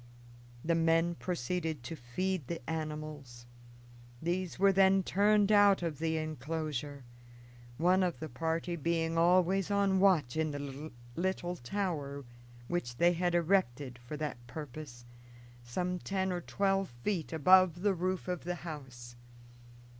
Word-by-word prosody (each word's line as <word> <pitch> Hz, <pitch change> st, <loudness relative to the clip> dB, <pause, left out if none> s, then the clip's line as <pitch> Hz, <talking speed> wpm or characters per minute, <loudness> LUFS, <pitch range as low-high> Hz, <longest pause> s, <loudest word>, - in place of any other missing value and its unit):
The 170 Hz, -, +2 dB
men 165 Hz, +1 st, +3 dB
proceeded 165 Hz, -3 st, -3 dB
to 165 Hz, -, -5 dB
feed 155 Hz, +5 st, -3 dB
the 170 Hz, +2 st, -6 dB
animals; 150 Hz, -6 st, -5 dB, 0.7 s
these 175 Hz, +3 st, -2 dB
were 195 Hz, +1 st, +5 dB
then 190 Hz, 0 st, +4 dB
turned 205 Hz, +2 st, +3 dB
out 205 Hz, -3 st, +5 dB
of 160 Hz, -4 st, -3 dB
the 160 Hz, 0 st, 0 dB
inclosure, 150 Hz, -2 st, -4 dB, 0.7 s
one 180 Hz, +4 st, +4 dB
of 180 Hz, -2 st, 0 dB
the 160 Hz, -, -4 dB
party 165 Hz, +5 st, -2 dB
being 165 Hz, +1 st, 0 dB
always 180 Hz, +3 st, +3 dB
on 200 Hz, -1 st, +2 dB
watch 175 Hz, -11 st, +3 dB
in 160 Hz, 0 st, +1 dB
the 145 Hz, +1 st, -6 dB, 0.3 s
little 180 Hz, -1 st, -1 dB
tower 140 Hz, -2 st, -3 dB, 0.4 s
which 120 Hz, -9 st, -3 dB
they 175 Hz, +4 st, +4 dB
had 175 Hz, 0 st, 0 dB
erected 145 Hz, -8 st, +1 dB
for 120 Hz, +5 st, -7 dB
that 150 Hz, -3 st, -3 dB
purpose 130 Hz, -3 st, -8 dB, 0.6 s
some 180 Hz, +9 st, -2 dB
ten 190 Hz, 0 st, -1 dB
or 175 Hz, -1 st, -2 dB
twelve 195 Hz, +2 st, 0 dB
feet 185 Hz, -7 st, -1 dB
above 180 Hz, +2 st, +5 dB
the 205 Hz, -1 st, +3 dB
roof 185 Hz, +1 st, -2 dB
of 180 Hz, -1 st, -3 dB
the 180 Hz, +1 st, -2 dB
house. 125 Hz, -6 st, -8 dB
165 Hz, 135 wpm, -32 LUFS, 150-185 Hz, 0.7 s, were